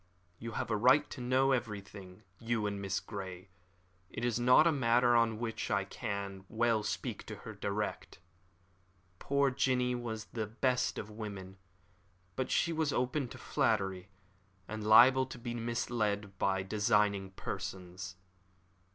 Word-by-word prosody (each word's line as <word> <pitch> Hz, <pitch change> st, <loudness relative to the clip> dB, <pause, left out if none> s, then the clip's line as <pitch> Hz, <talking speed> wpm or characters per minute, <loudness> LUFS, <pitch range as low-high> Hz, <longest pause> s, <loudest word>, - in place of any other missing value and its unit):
"You 115 Hz, 0 st, -6 dB
have -, -, -3 dB
a -, -, +2 dB
right 130 Hz, +7 st, +5 dB
to 130 Hz, -, -7 dB
know 130 Hz, +2 st, +3 dB
everything 100 Hz, -5 st, -4 dB, 0.2 s
you 115 Hz, -2 st, -1 dB
and 100 Hz, -1 st, -2 dB
Miss 95 Hz, -1 st, -1 dB
Grey. 95 Hz, -2 st, -7 dB, 0.6 s
It 115 Hz, +5 st, -4 dB
is 120 Hz, -1 st, 0 dB
not 125 Hz, +5 st, +6 dB
a 170 Hz, -, +5 dB
matter 120 Hz, -3 st, +3 dB
on 115 Hz, -2 st, +3 dB
which 115 Hz, -1 st, -3 dB
I 100 Hz, -2 st, +1 dB
can 100 Hz, -3 st, -5 dB
well 115 Hz, -1 st, +2 dB
speak 105 Hz, -, -4 dB
to -, -, -6 dB
her -, -, -6 dB
direct. 105 Hz, +1 st, -3 dB, 1.0 s
Poor 140 Hz, -1 st, +2 dB
Jinny 125 Hz, -1 st, +1 dB
was 115 Hz, -3 st, -4 dB
the 110 Hz, -2 st, -2 dB
best 125 Hz, +3 st, 0 dB
of 105 Hz, -, -6 dB
women, 100 Hz, -3 st, -7 dB, 0.8 s
but 130 Hz, -, -2 dB
she 170 Hz, -, +2 dB
was 155 Hz, -2 st, 0 dB
open 125 Hz, +2 st, 0 dB
to -, -, -10 dB
flattery, 95 Hz, -8 st, 0 dB, 0.6 s
and 110 Hz, 0 st, -5 dB
liable 125 Hz, +4 st, +7 dB
to -, -, -8 dB
be 120 Hz, 0 st, -5 dB
misled 115 Hz, -4 st, -2 dB
by 95 Hz, -1 st, +1 dB
designing 105 Hz, -1 st, +1 dB
persons. 95 Hz, 0 st, -6 dB
110 Hz, 145 wpm, -33 LUFS, 100-125 Hz, 1.0 s, liable